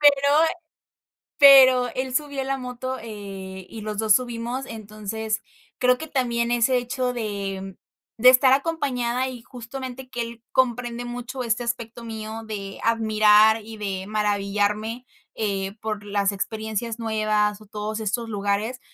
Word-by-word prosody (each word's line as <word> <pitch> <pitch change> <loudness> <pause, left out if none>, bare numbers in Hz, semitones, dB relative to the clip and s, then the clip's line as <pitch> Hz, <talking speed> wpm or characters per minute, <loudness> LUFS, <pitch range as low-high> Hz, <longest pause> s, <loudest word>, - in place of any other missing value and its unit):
pero 280 -1 +5 1.1
pero 260 -3 +8
él 260 -1 -2
subió 285 -1 -1
la 270 0 -1
moto, 255 0 -5
eh, 195 -4 -8
y 225 - -8
los 210 -1 -5
2 215 -2 +4
subimos, 245 +1 -2
entonces, 215 0 -4 0.4
creo 250 0 +3
que 315 - -6
también 240 -4 0
ese 240 +2 +3
hecho 250 +1 -2
de 195 -4 -4 0.4
de 250 +3 +6
estar 260 +1 +7
acompañada 260 -5 0
y 245 -2 -8
justamente 255 +1 -8
que 245 - -5
él 230 0 -8
comprende 245 -1 0
mucho 245 +1 -5
este 235 +1 -1
aspecto 235 0 -4
mío 220 0 -6
de 195 -2 -6
admirar 220 -1 +5
y 225 0 -9
de 195 -2 -4
maravillarme, 210 +2 -1 0.3
eh, 195 -2 -2
por 215 -2 -4
las 200 -1 +1
experiencias 220 +3 -4
nuevas 215 -2 0
o 215 - -15
todos 210 +1 -4
estos 225 +2 -2
lugares, 205 +4 -1
225 Hz, 140 wpm, -24 LUFS, 210-250 Hz, 1.1 s, pero